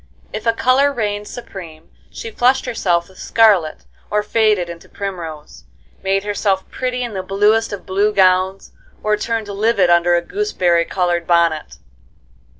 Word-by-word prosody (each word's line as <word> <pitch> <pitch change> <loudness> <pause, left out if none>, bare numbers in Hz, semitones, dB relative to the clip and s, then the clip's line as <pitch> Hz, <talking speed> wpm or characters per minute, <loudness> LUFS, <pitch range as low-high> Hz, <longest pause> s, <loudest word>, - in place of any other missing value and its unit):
If 215 +2 -5
a 230 - +4
color 255 +5 +3
reigned 210 -5 -3
supreme 175 -9 -10 0.2
she 225 - -8
flushed 255 +4 +2
herself 180 -8 0
with 190 - -18
scarlet 200 -9 +2 0.2
or 210 0 0
faded 210 -4 +2
into 170 -1 -10
primrose, 170 -7 -7 0.4
made 195 0 0
herself 200 -2 -1
pretty 250 -1 -2
in 235 -3 -5
the 190 - -3
bluest 210 +4 +2
of 205 - -7
blue 200 +3 +1
gowns, 190 -1 +2 0.3
or 215 0 +2
turned 220 0 -3
livid 200 -2 +2
under 175 0 +4
a 170 - 0
gooseberry 175 - 0
colored 175 -2 -1
bonnet. 170 -3 +1
200 Hz, 150 wpm, -18 LUFS, 175-225 Hz, 0.4 s, a